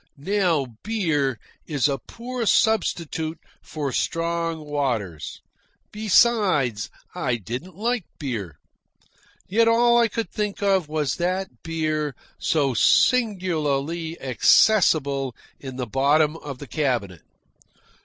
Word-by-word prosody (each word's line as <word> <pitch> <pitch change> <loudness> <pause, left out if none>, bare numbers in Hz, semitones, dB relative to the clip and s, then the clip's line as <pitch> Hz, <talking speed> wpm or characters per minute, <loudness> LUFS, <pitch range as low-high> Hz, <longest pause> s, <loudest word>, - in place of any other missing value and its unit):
Now 175 -2 +1 0.2
beer 160 - 0 0.3
is 145 -3 +1
a 140 -2 -1
poor 235 - -5
substitute 165 -8 +1 0.2
for 145 -3 -4
strong 165 +3 -1
waters: 115 - -3 0.5
besides, 200 - +2 0.2
I 135 -9 -1
didn't 125 - -6
like 230 0 -1
beer, 105 - -5 0.9
yet 225 +4 +3
all 235 +1 +5
I 235 - +4
could 225 +1 -4
think 210 -1 -3
of 190 -5 +2
was 155 -2 -1
that 185 +2 -2
beer 155 -3 -2 0.2
so 140 -5 +1
singularly 165 - +1
accessible 140 - +3 0.2
in 130 -2 -8
the 125 -1 -3
bottom 145 +6 +2
of 140 -4 -7
the 145 - -9
cabinet. 120 - -1
155 Hz, 105 wpm, -24 LUFS, 135-195 Hz, 0.9 s, all